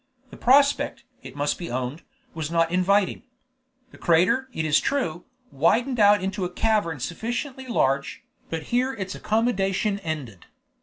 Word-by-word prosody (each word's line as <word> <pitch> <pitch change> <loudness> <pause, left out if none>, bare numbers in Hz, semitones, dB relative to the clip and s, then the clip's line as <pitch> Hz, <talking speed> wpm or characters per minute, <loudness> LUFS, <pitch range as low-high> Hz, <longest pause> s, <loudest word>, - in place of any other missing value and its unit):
The - - -10
prospect, 280 +3 +3 0.2
it - - -11
must 145 0 -1
be 170 - -5
owned, 130 +5 -3 0.3
was 160 -2 -4
not 165 0 +1
inviting. 190 +2 +2 0.7
The - - -16
crater, 180 +11 +2
it 160 - -3
is 155 -1 +4
true, 180 - -2 0.3
widened 230 - +1
out 205 -2 +5
into 190 0 -2
a 180 - -1
cavern 180 -5 0
sufficiently 240 - -4
large, 140 - 0 0.3
but 165 -1 -4
here 255 +2 +2
its 190 -3 -5
accommodation 205 -2 0
ended. 145 - -6
185 Hz, 145 wpm, -24 LUFS, 160-230 Hz, 0.7 s, out